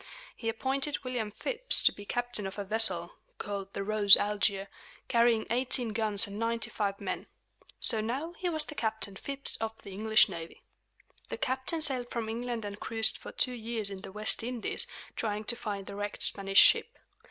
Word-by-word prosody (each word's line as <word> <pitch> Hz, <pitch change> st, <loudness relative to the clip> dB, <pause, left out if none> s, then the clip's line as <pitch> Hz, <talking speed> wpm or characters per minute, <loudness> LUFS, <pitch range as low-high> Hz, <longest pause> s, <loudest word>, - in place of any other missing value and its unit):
He 225 Hz, -, -4 dB
appointed 270 Hz, +6 st, -2 dB
William 245 Hz, -4 st, -3 dB
Phips -, -, +3 dB
to -, -, +6 dB
be 205 Hz, -, -12 dB
captain 245 Hz, -3 st, -1 dB
of 190 Hz, -, -9 dB
a 205 Hz, -, -3 dB
vessel, 220 Hz, +3 st, +2 dB, 0.2 s
called 200 Hz, -1 st, -6 dB
the 200 Hz, -, -4 dB
Rose 205 Hz, -1 st, +7 dB
Algier, 200 Hz, -1 st, 0 dB, 0.4 s
carrying 235 Hz, -2 st, +2 dB
eighteen 250 Hz, -1 st, +1 dB
guns 215 Hz, -2 st, +2 dB
and 200 Hz, +1 st, -8 dB
ninety 230 Hz, 0 st, -2 dB
five 200 Hz, -1 st, -2 dB
men. -, -, -5 dB, 0.5 s
So 225 Hz, -3 st, +2 dB
now 270 Hz, +10 st, -4 dB
he 355 Hz, 0 st, -3 dB
was 315 Hz, -2 st, 0 dB
Captain 220 Hz, -8 st, -4 dB
Phips 275 Hz, +6 st, -3 dB
of 225 Hz, 0 st, -5 dB
the 200 Hz, -, -10 dB
English 215 Hz, +3 st, +4 dB
navy. 170 Hz, -4 st, -9 dB, 0.7 s
The -, -, -5 dB
captain 260 Hz, +5 st, -2 dB
sailed 255 Hz, -5 st, 0 dB
from 230 Hz, -2 st, -4 dB
England 235 Hz, -1 st, -4 dB
and 205 Hz, 0 st, -7 dB
cruised 225 Hz, -1 st, +4 dB
for -, -, -10 dB
two 255 Hz, -, +2 dB
years 225 Hz, -3 st, -2 dB
in 190 Hz, -1 st, -8 dB
the 190 Hz, -, -9 dB
West 210 Hz, +2 st, +1 dB
Indies, 240 Hz, 0 st, -1 dB, 0.3 s
trying 215 Hz, -1 st, -3 dB
to 235 Hz, -, -2 dB
find 205 Hz, -4 st, -5 dB
the -, -, -9 dB
wrecked 205 Hz, 0 st, -3 dB
Spanish 195 Hz, -1 st, 0 dB
ship. -, -, +5 dB
220 Hz, 180 wpm, -29 LUFS, 205-245 Hz, 0.7 s, Rose